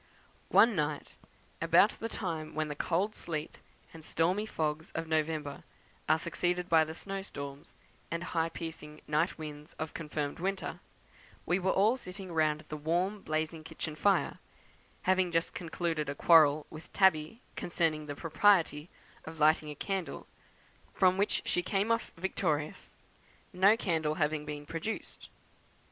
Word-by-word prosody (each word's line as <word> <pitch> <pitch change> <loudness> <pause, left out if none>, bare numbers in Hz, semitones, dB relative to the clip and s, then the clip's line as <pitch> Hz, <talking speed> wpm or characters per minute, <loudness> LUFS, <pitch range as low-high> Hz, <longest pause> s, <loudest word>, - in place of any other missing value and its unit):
One 230 -1 +6
night, 150 -2 -2 0.5
about - - +5
the 225 - -5
time 165 -8 -4
when 155 -1 -1
the 145 - -4
cold 185 +8 0
sleet 155 -5 -5 0.3
and 165 -1 -11
stormy 180 +8 +1
fogs 155 -4 -2
of 165 - -2
November 155 -2 -1 0.5
are 155 - +6
succeeded 175 +2 -1
by 165 -2 +5
the 160 +1 -7
snow 195 +2 -4
storms, 140 -6 -8 0.3
and 170 0 -3
high 165 -2 0
piercing 155 -2 -7
night 155 +4 +1
winds 150 -1 -8
of 155 0 -5
confirmed 150 -2 -4
winter, 195 +2 -2 0.7
we 180 - +2
were 190 0 0
all 215 +7 +4
sitting 185 -4 -8
round 155 -2 +1
the 155 - -4
warm 175 +7 0
blazing 155 0 -2
kitchen 160 -1 -5
fire, 200 +5 +2 0.6
having 185 -1 +2
just 165 0 0
concluded 165 -3 -2
a 140 - -3
quarrel 155 -2 +6
with 155 +1 -11
Tabby 190 +4 +3
concerning 155 -3 -1
the 145 - -4
propriety 165 -1 +3 0.4
of 160 0 -9
lighting 155 0 +4
a 150 - -6
candle, 190 +3 -3 0.7
from 185 -1 +4
which 200 +2 +1
she 180 - +1
came 195 +4 0
off 230 0 0
victorious, 160 -4 -2 0.6
no 195 +4 +5
candle 160 -7 0
having 150 -1 0
been 145 0 -6
produced. 165 +9 -5
165 Hz, 145 wpm, -31 LUFS, 155-185 Hz, 0.7 s, One